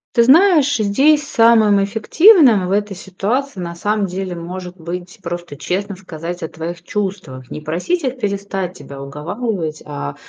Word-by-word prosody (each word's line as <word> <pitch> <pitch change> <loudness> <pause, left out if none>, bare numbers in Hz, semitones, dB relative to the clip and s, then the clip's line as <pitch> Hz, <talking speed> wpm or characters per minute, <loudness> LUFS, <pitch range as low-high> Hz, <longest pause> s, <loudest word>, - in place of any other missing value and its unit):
Ты 235 - +6
знаешь, 295 0 +5
здесь 275 +8 +3
самым 220 -3 +4
эффективным 230 - +5
в - - -3
этой 205 -1 0
ситуации, 200 +6 -3
на 170 -1 -5
самом 205 +3 0
деле, 185 0 -4
может 180 +1 -7
быть 180 +4 -7
просто 175 -4 -6
честно 195 +4 -3
сказать 175 -1 -7
о 160 - -3
твоих 170 +2 -7
чувствах. 185 - -5
Не - - -5
просить 180 - -2
их 260 0 -2
перестать 200 -4 -3
тебя 140 -1 -10
уговаривать, 160 - -4
а 70 0 -5
195 Hz, 150 wpm, -18 LUFS, 170-225 Hz, -, Ты